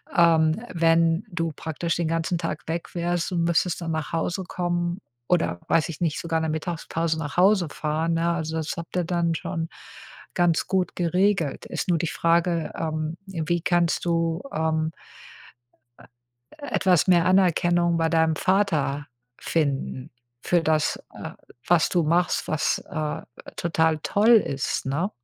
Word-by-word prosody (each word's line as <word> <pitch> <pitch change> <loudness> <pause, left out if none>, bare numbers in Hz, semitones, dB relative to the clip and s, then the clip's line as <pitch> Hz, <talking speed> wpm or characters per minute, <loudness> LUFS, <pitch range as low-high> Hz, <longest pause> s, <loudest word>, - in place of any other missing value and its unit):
ähm, 165 +3 +4
wenn 165 +1 +3
du 165 -2 -2
praktisch 165 +3 -3
den 170 -2 0
ganzen 165 +2 0
Tag 165 -2 -4
weg 165 +2 -4
wärst 175 +1 -1
und 170 -1 +1
müsstest 170 +1 +1
dann 165 -1 -3
nach 155 0 -3
Hause 175 +3 -1
kommen 175 0 -2 0.3
oder, 165 - +1
weiß 165 +1 +2
ich 160 - -7
nicht, 160 -3 0
sogar 165 -1 -1
in - - -2
der 160 - -1
Mittagspause 160 0 -2
nach 145 -3 -5
Hause 190 -1 +4
fahren, 155 +3 -1
ne? 165 +1 +1
Also, 160 -1 -3
das 160 -1 -2
habt 170 +1 -7
ihr 180 - +1
dann 170 -1 0
schon 165 +1 -3 0.7
ganz 175 -3 +2
gut 185 -2 0
geregelt. 180 -3 +1
Ist - - -4
nur 175 - +3
die 165 - -1
Frage, 170 0 +1
ähm, 155 0 -3
wie 175 -2 -2
kannst 175 0 +1
du, 165 0 0
ähm 160 0 0 1.1
äh, - - -17 0.7
etwas 180 -5 +3
mehr 175 -2 +5
Anerkennung 175 -2 +3
bei 165 0 +1
deinem 160 -1 +2
Vater 155 -7 +1 0.3
finden 140 -3 -2 0.3
für 175 -2 +2
das, 155 -1 +1 0.2
äh, - - -7 0.4
was 170 -2 +4
du 175 - +2
machst, 170 +3 +1
was, 155 - +1
äh, 155 -1 -3 0.3
total 160 -2 +1
toll 205 +8 +2
ist, 140 -12 -1
ne? 155 +9 -1
165 Hz, 155 wpm, -25 LUFS, 160-175 Hz, 1.1 s, mehr